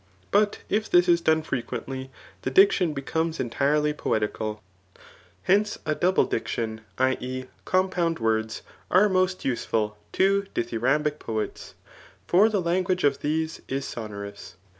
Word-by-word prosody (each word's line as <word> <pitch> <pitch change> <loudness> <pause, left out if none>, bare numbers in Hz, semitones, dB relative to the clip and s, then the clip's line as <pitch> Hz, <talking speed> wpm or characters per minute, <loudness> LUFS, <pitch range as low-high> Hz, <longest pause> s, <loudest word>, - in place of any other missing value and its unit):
But 205 0 +2
if 215 +1 0
this 175 0 +5
is 170 -1 +4
done 160 -1 +2
frequently, 130 -1 -4 0.3
the - - -2
die 195 +9 +7
tion 175 -5 0
becomes 160 +4 -2
entifely 145 +5 +1
poeticaU 110 -5 -2 0.9
H^nce, 210 +2 +3
a 155 - +1
double 180 +4 +2
diction 110 -1 -3 0.2
[i, 130 0 +2
e. 130 +1 -5 0.2
compound 185 -3 +1
words,] 110 0 -1 0.3
are 190 +4 +5
most 185 -1 0
useful 110 -4 -1
to 195 +1 +2
dithyrambic 135 +6 0
poets; 110 -1 -4 0.5
for 200 +5 +5
the 205 -3 0
language 180 +1 0
of 140 -1 +3
these 160 +2 -2
is 135 +1 -2
sonorous. 100 -4 -7
150 Hz, 135 wpm, -26 LUFS, 120-185 Hz, 0.9 s, die